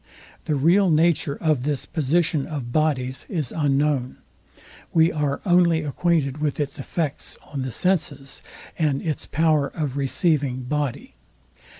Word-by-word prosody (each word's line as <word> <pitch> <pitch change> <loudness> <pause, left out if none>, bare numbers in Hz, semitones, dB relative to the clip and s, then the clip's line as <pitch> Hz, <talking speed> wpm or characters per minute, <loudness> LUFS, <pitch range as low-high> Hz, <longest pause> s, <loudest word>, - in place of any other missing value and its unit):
The 150 - 0
real 175 +7 +4
nature 160 -2 +2
of 155 -6 +1
this 140 -1 -2
position 155 -1 0
of 140 -7 -5
bodies 130 -4 0
is 155 -8 -2
unknown. 145 -3 0 0.8
We 165 +1 +5
are 145 -2 -1
only 175 -3 +4
acquainted 150 -2 0
with 150 -1 -1
its 145 -1 -3
effects 150 +1 -3 0.2
on 140 - -2
the 130 -1 -3
senses, 145 -5 -1 0.4
and 145 -4 +1
its 155 -4 -3
power 155 -2 +2
of 140 -1 -4
receiving 140 -2 +1
body. 145 0 -3
150 Hz, 130 wpm, -23 LUFS, 135-160 Hz, 0.8 s, We